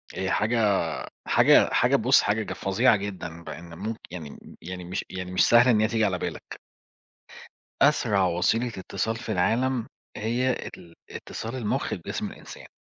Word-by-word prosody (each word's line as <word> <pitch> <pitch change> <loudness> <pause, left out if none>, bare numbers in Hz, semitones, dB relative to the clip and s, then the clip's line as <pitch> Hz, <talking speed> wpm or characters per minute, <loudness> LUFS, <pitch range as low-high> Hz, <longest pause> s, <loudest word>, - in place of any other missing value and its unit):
هي 95 0 -2
حاجة 105 -3 +2 0.4
حاجة - - +5
حاجة - - +4
بُص - - +4
حاجة 105 +2 0
ج - - -5
فظيعة 105 +4 +2
جدًا، 90 -4 -6
بإن 85 +2 -9
ممك 110 +1 -4
يعني 80 -5 -7
م - - -12 0.2
يعني 90 +1 -7
مش 90 +2 -4
يعني 90 -1 -6
مش 90 - +3
سهل 120 +2 +6
إن 110 -4 +4
هي 110 - +3
تيجي 115 -1 +1
على 95 -3 0
بالك. 85 -2 -6 1.2
أسرع 95 -2 +3
وسيلة 90 +8 +1
اتصال 105 0 -3
في 115 0 -6
العالم، 115 +5 +1 0.3
هي 120 +4 0
ال 85 -8 -8 0.2
اتصال 115 +3 -7
المُخ 115 -5 -2
بجسم - - -4
الإنسان. - - -12
100 Hz, 160 wpm, -26 LUFS, 90-115 Hz, 1.2 s, سهل